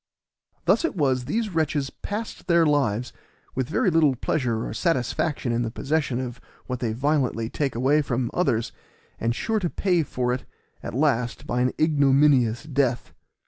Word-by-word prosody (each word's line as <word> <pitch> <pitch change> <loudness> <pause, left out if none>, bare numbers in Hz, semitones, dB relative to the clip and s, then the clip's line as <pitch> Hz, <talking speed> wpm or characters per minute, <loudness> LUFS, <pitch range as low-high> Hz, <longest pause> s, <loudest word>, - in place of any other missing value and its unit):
Thus - - +3
it 335 - -1
was 130 -6 +1
these 220 - -1
wretches 150 -4 0
passed 210 +2 -6
their 170 -2 +4
lives, 130 -6 +1 0.4
with 130 -1 -2
very 180 - +2
little 155 -5 +4
pleasure 120 -3 -1
or - - -5
satisfaction 145 -3 0
in 120 0 0
the 115 - -1
possession 140 +1 -1
of 125 -2 -5 0.2
what 125 -1 -4
they 115 -2 -1
violently 125 -2 0
take 140 -5 -1
away 135 +6 +3
from 125 -4 -2
others, 120 -10 0 0.5
and 115 +1 0
sure 220 - 0
to 175 -4 -1
pay 180 -2 +1
for 125 -4 -1
it 125 - -3 0.4
at - - -6
last 125 -4 0
by 125 - -1
an 125 0 +2
ignominious 140 -5 +3
death. 135 -5 -1
135 Hz, 165 wpm, -25 LUFS, 120-155 Hz, 0.5 s, their